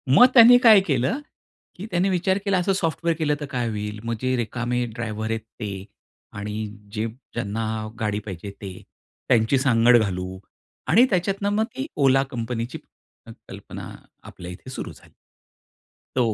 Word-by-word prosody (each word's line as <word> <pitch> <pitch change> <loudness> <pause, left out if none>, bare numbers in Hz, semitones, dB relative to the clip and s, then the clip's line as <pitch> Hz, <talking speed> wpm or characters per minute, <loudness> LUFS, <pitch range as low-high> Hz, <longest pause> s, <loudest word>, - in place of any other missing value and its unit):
मग 245 - +9
त्यांनी 245 0 +9
काय 215 -3 +9
केलं? 135 - +1 0.6
की 185 - -7
त्यांनी 180 +2 +2
विचार 190 +1 +1
केला, 200 -2 +2
असं 195 +2 +1
सॉफ्टवेअर 170 -2 0
केलं 150 -2 +1
तर 145 - -4
काय 120 -3 -1
होईल? 105 -1 -4
मग 115 0 -2
जे 130 0 +1
रिकामे 120 +1 -1
ड्रायव्हर 110 -2 -4
आहेत 115 - -1 0.2
ते, 100 -3 -5 0.5
आणि 105 +1 -4 0.3
जे 110 0 -1 0.3
ज्यांना 110 -1 -3 0.3
गाडी 105 -2 -1
पाहिजे 100 0 -7
ते, 95 -2 -6 0.6
त्यांची 120 +1 +4
सांगड 120 -2 +5
घालू. 95 -3 -2 0.5
आणि 230 +9 +6
त्याच्यातनं 195 +2 0
मग 220 +1 +2
ती 270 +3 -3
ओला 135 -1 +4
कंपनीची 115 0 -4
क - - -23 0.2
कल्पना - - -9 0.3
आपल्या 90 0 -9
इथे 90 +8 -11
सुरू 130 - -6
झाली. - - -20 1.0
तो 120 -4 +2
120 Hz, 155 wpm, -23 LUFS, 110-170 Hz, 1.0 s, मग